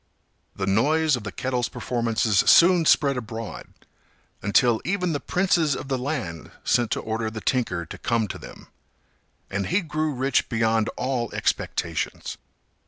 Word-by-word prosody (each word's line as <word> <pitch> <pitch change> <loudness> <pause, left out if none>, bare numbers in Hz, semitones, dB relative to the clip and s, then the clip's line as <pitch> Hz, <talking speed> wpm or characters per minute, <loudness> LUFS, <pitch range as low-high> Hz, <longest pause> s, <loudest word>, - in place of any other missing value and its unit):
The 95 - -2
noise 150 +10 +3
of 120 - -6
the 100 - -5
kettle's 125 +1 -2
performances 115 -4 0
soon 175 -1 +6
spread 140 -3 +4
abroad, 115 -2 -6 0.7
until 110 +3 +3
even 180 -2 -1
the 145 - -1
princes 170 -6 +1
of 135 - -7
the 135 - 0
land 125 - -4
sent 120 -2 +2
to - - -2
order 110 0 -2
the 110 0 -6
tinker 115 -8 -1
to - - -9
come 115 -2 0
to - - -6
them; - - -12 0.9
and 100 0 -2
he 185 +4 +2
grew 155 -2 -2
rich 130 0 +1
beyond 115 -1 +1
all 125 -3 -1
expectations. - - -2
125 Hz, 150 wpm, -24 LUFS, 110-150 Hz, 0.9 s, soon